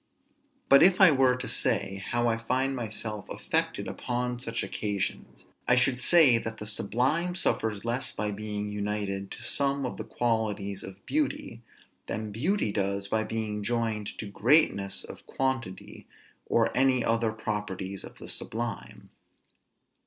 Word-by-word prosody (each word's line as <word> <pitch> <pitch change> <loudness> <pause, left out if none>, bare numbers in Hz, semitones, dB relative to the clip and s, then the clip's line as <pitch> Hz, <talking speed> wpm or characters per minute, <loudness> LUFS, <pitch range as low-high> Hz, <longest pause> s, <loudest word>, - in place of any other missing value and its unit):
But 140 - +7
if 185 +1 +6
I 190 -5 +8
were 130 -2 +4
to - - -5
say 100 0 0
how 120 0 +1
I 115 - +2
find 130 +4 -1
myself 110 -3 -4
affected - - -2
upon 125 0 -3
such 115 -2 -3
occasions, 100 -2 -3 0.2
I 125 - +5
should 125 0 +2
say 145 -9 +6
that 115 0 -6
the 105 - -7
sublime 130 - 0
suffers 110 - 0
less 120 +3 -1
by 105 -1 -2
being 105 0 -4
united 100 -1 -3
to - - -7
some 140 -1 +2
of 125 - -4
the 110 - -4
qualities 110 -4 -1
of 95 0 -10
beauty, 290 - -1 0.5
than 110 0 -4
beauty 145 - 0
does 100 0 -1
by 110 +1 +1
being 110 -2 -3
joined 110 -1 -2
to - - -5
greatness 100 -2 +3
of - - -11
quantity, 130 -8 -3 0.4
or - - +2
any 130 -1 +3
other 115 -1 +1
properties 105 -3 -4
of - - -11
the - - -10
sublime. 115 -3 -3
115 Hz, 145 wpm, -28 LUFS, 105-125 Hz, 0.5 s, I